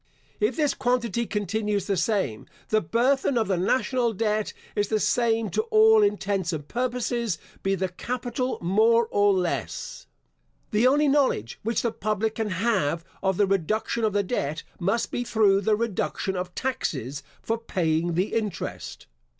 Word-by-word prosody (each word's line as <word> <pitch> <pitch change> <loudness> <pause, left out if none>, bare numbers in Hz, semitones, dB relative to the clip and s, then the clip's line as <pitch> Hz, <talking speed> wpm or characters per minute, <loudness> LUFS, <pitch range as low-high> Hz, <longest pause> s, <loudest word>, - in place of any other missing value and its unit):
If 425 - +1
this 300 -3 +1
quantity 235 -3 0
continues 210 -1 -1
the 200 - 0
same, 175 - -1 0.2
the 215 0 +3
burthen 250 - +1
of 225 - +1
the 190 - +1
national 240 +5 +1
debt 215 0 0 0.2
is 205 0 +1
the 215 +1 +1
same 225 -1 +1
to - - +1
all 440 0 +6
intents 200 - 0
and 150 -3 -5
purposes, 240 -4 -1 0.2
be 195 0 +1
the 190 0 -1
capital 250 +6 -3
more 225 +6 +3
or 205 0 +4
less. 140 - -3 0.6
The 220 +4 +4
only 290 +3 +4
knowledge 270 - +1
which 225 +1 -1
the 235 - +1
public 215 +1 -1
can 220 -2 -2
have 185 -5 0 0.2
of 190 -1 +1
the 205 - +4
reduction 195 +5 0
of 215 -2 +1
the 205 0 +2
debt, 155 - -2 0.2
must 195 +6 0
be 245 - -1
through 205 -4 +3
the 215 +2 +2
reduction 210 -3 -2
of 180 0 -4
taxes 140 - -3 0.2
for 225 0 -1
paying 170 -6 0
the 185 +4 0
interest. 215 -5 -4
215 Hz, 160 wpm, -25 LUFS, 185-235 Hz, 0.6 s, all